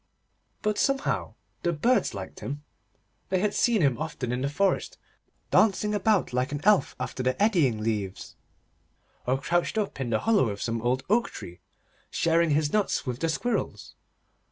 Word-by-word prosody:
But 210 -1 0
somehow 275 -1 0 0.3
the 175 - +1
Birds 195 - +1
liked 95 -1 -7
him. 145 +2 -5 0.7
They 190 - +2
had 205 +2 +1
seen 230 -5 +3
him 135 -3 +2
often 150 -6 -3
in 125 +1 -1
the 140 - 0
forest, 195 +7 0 0.5
dancing 210 0 +3
about 205 - +2
like 125 +3 0
an 145 - -2
elf 205 -9 +4
after 125 0 -4
the 130 0 0
eddying 165 - +3
leaves, 105 -4 -3 0.9
or 130 +2 +2
crouched 175 +8 0
up 205 -8 -2
in 125 - -2
the 110 -2 +1
hollow 210 - +3
of 100 -1 -5
some 115 +1 -2
old 125 +2 0
oak 235 +4 +2
tree, 85 0 -9 0.5
sharing 165 0 +2
his 150 0 +1
nuts 210 -2 +1
with 125 -1 -3
the 165 - 0
squirrels. 240 +9 -2
155 Hz, 165 wpm, -27 LUFS, 125-205 Hz, 0.9 s, elf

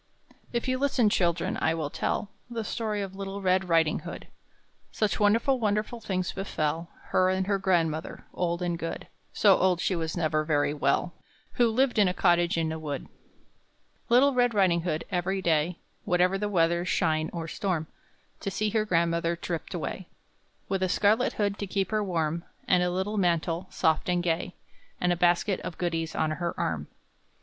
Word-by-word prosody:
If 235 +1 -2
you 255 0 0
listen, 260 -6 +2
children, 170 -3 +1
I 160 - +2
will 155 -3 -3
tell 200 - -2 0.2
The 230 -2 -3
story 210 -2 -2
of 190 -1 -7
little 195 0 -5
Red 185 -1 +1
Riding 165 -2 +3
hood: - - -8 0.6
Such 215 -2 0
wonderful, 230 +6 +3
wonderful 215 +2 -1
things 185 -3 -2
befell 165 -4 -2 0.2
Her 185 0 +3
and 190 0 0
her 200 0 0
grandmother, 165 -4 0
old 175 0 -1
and 175 -1 -1
good 165 - -4 0.3
(So 200 -3 +5
old 185 -2 +2
she 185 - 0
was 160 0 -3
never 155 -2 +1
very 145 -2 +1
well), 170 +3 0 0.4
Who 240 -1 +3
lived 245 0 +2
in 205 - +5
a 180 - -1
cottage 175 -2 +3
in 160 -1 0
a 160 - -4
wood. 145 -3 -5 1.0
Little 265 +4 +5
Red 245 -2 +2
Riding 180 -4 +3
hood, 160 -2 -2
every 190 +1 0
day, 170 -1 +1 0.3
Whatever 180 0 +2
the 205 +1 -1
weather, 170 -2 +2
shine 160 -3 +1
or 165 -2 -5
storm, 170 -1 -2 0.5
To - - -3
see 210 +2 -1
her 215 0 +1
grandmother 170 -2 +1
tripped 170 +1 -5
away, 175 +2 -4 0.6
With 195 -1 -1
a 185 - +1
scarlet 215 +6 +2
hood 205 -1 -1
to 200 - -3
keep 195 +2 -1
her 215 -1 +1
warm, 170 -3 -1 0.2
And 180 -1 +4
a 180 - +2
little 190 +4 -2
mantle, 170 -1 0
soft 160 +2 +1
and 175 -1 +1
gay, 175 +1 -1 0.4
And 180 0 +2
a - - -1
basket 175 +3 +2
of 185 - -7
goodies 165 -2 -2
on 155 - +1
her 170 +2 -3
arm. 75 -2 -2
180 Hz, 180 wpm, -27 LUFS, 165-200 Hz, 1.0 s, So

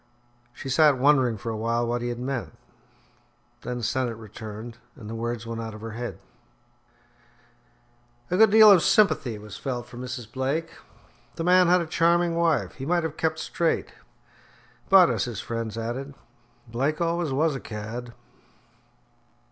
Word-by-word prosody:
She 125 - -9
sat 145 +1 +4
wondering 130 -4 +3
for 115 +3 -5
a - - -4
while 115 +2 0
what 120 +1 -2
he 120 - -2
had 120 - -4
meant. 125 0 -4 1.0
Then 125 -1 -5
Sennett 125 -1 -1
returned, 110 +1 -9 0.2
and 120 -7 -11
the 110 - -6
words 115 0 -4
went 115 0 -5
out 110 -1 -6
of 110 - -11
her 115 0 -6
head. 120 +2 -5 2.1
A 180 - +2
good 220 +1 +7
deal 215 0 +8
of 185 -4 +6
sympathy 195 - +3
was 105 -1 -10
felt 125 -3 -4
for 120 0 -13
Mrs. 125 -3 -6
Blake. 140 +6 -2 0.6
The 165 - -3
man 180 +1 +5
had 180 +1 +4
a - - -3
charming 170 +1 +2
wife; 160 - +1
he 130 - -9
might 175 0 +1
have 160 -2 -3
kept 160 0 -1
straight; 165 +1 -1 1.0
but - - +7
as - - -1
his - - -5
friends 115 -1 -4
added, 130 +5 -5 0.5
"Blake 135 +7 -1
always 170 -2 0
was 155 +3 +1
a 135 - -4
cad." 115 +2 -7
125 Hz, 160 wpm, -25 LUFS, 115-160 Hz, 2.1 s, deal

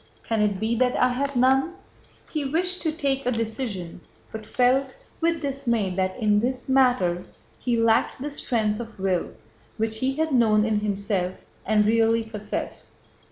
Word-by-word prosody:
Can 225 -2 +1
it 205 -2 +1
be 220 +2 0
that 250 +1 +2
I 250 - +4
have 275 +2 -2
none?" 265 +7 +3 0.5
He 305 -2 -3
wished 360 +6 -1
to 320 - 0
take 275 -4 -1
a - - +3
decision, 220 -7 -3 0.3
but 220 -1 -7
felt 260 +2 +2 0.2
with 330 -1 0
dismay 240 -8 0
that 185 0 -1
in 210 -3 +3
this 250 +3 -2
matter 245 -10 +3 0.4
he 240 -2 0
lacked 230 +2 +2
that 285 +2 -5
strength 215 -6 -1
of 230 -3 -8
will 190 -2 0 0.5
which 220 0 -2
he 265 +2 0
had 320 +1 0
known 215 -4 +4
in 215 -2 +1
himself 200 -3 -1 0.3
and 210 -1 +3
really 225 +1 +3
possessed. 215 -2 -5
230 Hz, 160 wpm, -25 LUFS, 210-265 Hz, 0.5 s, I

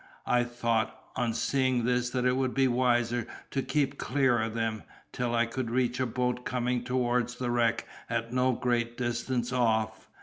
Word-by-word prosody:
I 120 0 +3
thought, 115 -2 -1 0.2
on 115 -1 0
seeing 130 -2 +1
this, 125 0 +1
that 125 0 -1
it 125 0 +3
would 130 -1 0
be 135 -1 +4
wiser 120 -1 +1 0.2
to 135 - 0
keep 140 0 0
clear 125 -3 +2
of 110 0 -3
them, 110 -2 -1 0.3
till 120 -1 -1
I 115 0 +3
could 120 0 -3
reach 125 +1 0
a 130 - +1
boat 125 +1 -1
coming 125 0 -1
towards 125 -1 0
the 125 -1 -2
wreck 115 -1 +1 0.2
at 115 0 -2
no 130 0 +3
great 120 -1 -1
distance 120 0 -1
off. 110 -3 0
120 Hz, 175 wpm, -29 LUFS, 115-125 Hz, 0.3 s, be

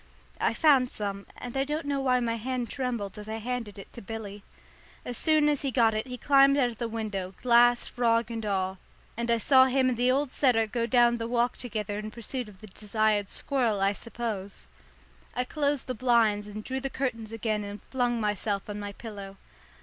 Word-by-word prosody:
I - - +1
found 275 -5 +4
some, 200 -3 -4
and 245 0 -7
I 270 - +2
don't 300 +2 -3
know 285 -1 -1
why 255 -2 +3
my 230 -1 0
hand 245 +1 -3
trembled 235 -7 -3
as 210 +1 -9
I 220 - -3
handed 230 -2 -4
it 195 - -11
to 235 - -9
Billy. 205 -1 -7 0.6
As 245 - -4
soon 310 +2 +3
as 295 -2 +1
he 275 - -1
got 230 -3 +3
it 215 +3 -2
he 250 0 -6
climbed 275 +2 +5
out 250 -4 +2
of 230 - -14
the 235 - -1
window, 205 -5 -4
glass, 240 0 +5
frog 235 -1 +1
and 225 -1 -4
all, 190 -2 -1 0.4
and 235 +1 -3
I 235 - +4
saw 260 +3 +6
him 260 0 +2
and 245 - -1
the 250 +1 +3
old 270 +1 +1
setter 245 -5 +3
go 230 +2 -2
down 240 0 +4
the 230 - -3
garden 235 - -5
walk 240 +1 +1
together 210 -4 -4
in 215 0 -5
pursuit 235 +1 -5
of 190 -3 -17
the - - -9
desired 210 0 0
squirrel, 240 -7 0
I 195 +1 +2
suppose. 210 - -5 0.7
I 250 - +1
closed 285 +1 -1
the 255 - -3
blinds 225 -4 +2
and 210 +1 -7
drew 265 +3 -3
the 270 +1 -3
curtains 235 -5 -3
again 215 -2 -2
and 205 +1 -7
flung 245 -2 +1
myself 210 -1 -1
on 205 - -5
my 205 0 -5
pillow. 200 -3 -9
235 Hz, 210 wpm, -28 LUFS, 210-255 Hz, 0.7 s, saw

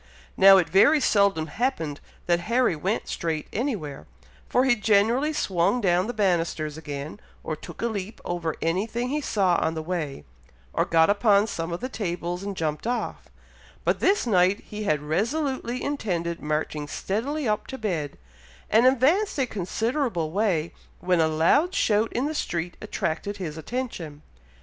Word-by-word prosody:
Now, 195 0 +8
it 180 -4 +2
very 200 - +5
seldom 200 - +3
happened, 160 - -2 0.3
that 175 -1 +2
Harry 240 -6 +3
went 190 +8 -2
straight 160 -2 -3
anywhere, 190 - -3 0.4
for 250 +2 +3
he 255 -2 +4
generally 225 +7 +2
swung 190 - +1
down 180 -2 +2
the - - -1
bannisters 165 -6 0
again, 150 +2 -6 0.2
or 155 - -3
took 155 - -9
a - - +2
leap 210 -2 -4
over 170 -2 -2
any 180 +6 0
thing 240 +2 -3
he 300 +2 -1
saw 190 -9 +2
on 160 +1 0
the 160 - -4
way, 155 -5 -4 0.5
or - - +1
got 165 +2 +4
upon 205 -1 +4
some 165 -5 -4
of 170 - -4
the 255 - -2
tables 175 -6 -3
and 200 -1 -5
jumped 155 +5 -2
off, 245 0 -3 0.6
but - - +1
this 395 -5 +2
night 190 -2 +3
he 210 0 -6
had 150 -6 +1
resolutely 245 - -1
intended 175 -12 -2
marching 150 0 -2
steadily 255 - -2
up 210 -1 -1
to 265 - -6
bed, 170 - -3 0.5
and 230 +4 +6
advanced 295 - +3
a 270 - +2
considerable 220 - -2
way, 180 -5 0 0.3
when 180 -2 +2
a 160 - +4
loud 170 - +2
shout 215 +1 +2
in 250 +4 -1
the 305 - -2
street 175 - -3
attracted 200 +5 -3
his 165 -6 -5
attention. 165 - -5
195 Hz, 165 wpm, -25 LUFS, 165-240 Hz, 0.6 s, Now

